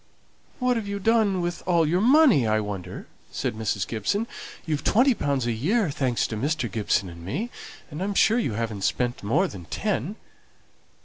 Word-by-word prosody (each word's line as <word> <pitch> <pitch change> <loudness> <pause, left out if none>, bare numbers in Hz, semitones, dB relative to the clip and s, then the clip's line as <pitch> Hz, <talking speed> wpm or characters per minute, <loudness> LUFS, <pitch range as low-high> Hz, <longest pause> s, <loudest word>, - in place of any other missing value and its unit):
"What 250 -1 +1
have 220 -3 -4
you 200 0 -3
done 205 -3 +2
with 175 0 -3
all 170 -3 +3
your 175 +4 +1
money, 250 - +5
I 110 0 +2
wonder?" 100 -4 -6 0.3
said - - -2
Mrs. 110 -2 -2
Gibson. 120 - -1 0.4
"You've 155 -3 -2
twenty 255 +4 +4
pounds 140 - -1
a 120 - 0
year, 170 - +1
thanks 130 -4 0
to 110 - -4
Mr. 140 +2 -1
Gibson 105 -3 0
and 85 -1 -10
me; 205 - -3 0.4
and 150 +4 -6
I'm 200 +1 -2
sure 225 +4 +4
you 135 - -1
haven't 110 -2 -3
spent 120 -1 0
more 150 - +2
than 90 - -9
ten." 210 - -2
155 Hz, 180 wpm, -25 LUFS, -, 0.4 s, money